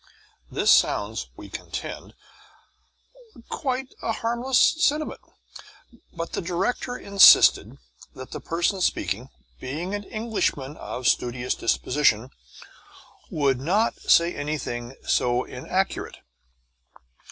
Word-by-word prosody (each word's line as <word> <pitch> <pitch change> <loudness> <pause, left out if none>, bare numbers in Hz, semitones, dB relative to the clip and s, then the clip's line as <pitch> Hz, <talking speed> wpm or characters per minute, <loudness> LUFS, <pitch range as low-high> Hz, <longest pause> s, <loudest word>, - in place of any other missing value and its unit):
This - - +2
sounds - - +2
(we - - -10
contend) - - -7 1.3
quite 260 -2 -3
a 225 - -1
harmless 240 +3 -1 0.3
sentiment, 305 0 0 0.9
but 170 -1 -6
the - - -2
director 190 +8 -2
insisted 200 -1 +6 0.4
that 130 0 -10
the - - -5
person 175 +3 -1
speaking, 125 - -1 0.3
being 160 +9 -5
an 205 0 -4
Englishman 210 - -2
of 125 -4 -5
studious 125 -1 0
disposition, 125 0 +1 1.0
would 140 -4 +1
not 195 - +1
say 170 +1 +4
anything 135 -4 -4
so 125 0 +1
inaccurate. 185 +10 -3
170 Hz, 95 wpm, -24 LUFS, 130-215 Hz, 1.3 s, insisted